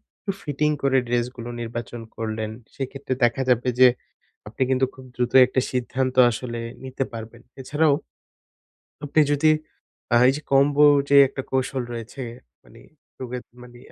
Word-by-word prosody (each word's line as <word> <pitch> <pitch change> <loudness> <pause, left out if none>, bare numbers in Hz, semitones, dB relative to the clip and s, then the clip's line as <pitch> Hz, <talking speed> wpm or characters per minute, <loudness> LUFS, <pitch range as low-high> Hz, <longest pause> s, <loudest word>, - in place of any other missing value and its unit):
একটু 200 - -4
ফিটিং 150 +1 -1
করে 135 -1 +3
ড্রেসগুলো 120 0 -2
নির্বাচন 120 0 -6
করলেন, 110 -1 -4 0.2
সেক্ষেত্রে 135 0 -4
দেখা 120 +2 +2
যাবে 125 0 +2
যে, 130 - +9 0.6
আপনি 115 +5 -5
কিন্তু 130 0 +2
খুব 130 - -13
দ্রুত 125 0 -1
একটা 130 +1 0
সিদ্ধান্ত 130 +1 -2 0.2
আসলে 120 +1 -5 0.2
নিতে 130 +1 -3
পারবেন। 115 +1 -9 0.2
এছাড়াও 145 +3 +2 1.1
আপনি 145 +2 +2
যদি 150 +2 +3 0.6
আ - - +6
এই - - +4
যে 150 - -8
কম্বোর 145 +2 +5 0.2
যে 140 - +6
একটা 135 0 -6
কৌশল 130 0 -1
রয়েছে, 115 +3 -7 0.4
মানে - - -17 0.4
রোগের 125 -1 -5 0.2
মানে 120 0 -14
130 Hz, 140 wpm, -23 LUFS, 120-135 Hz, 1.1 s, যে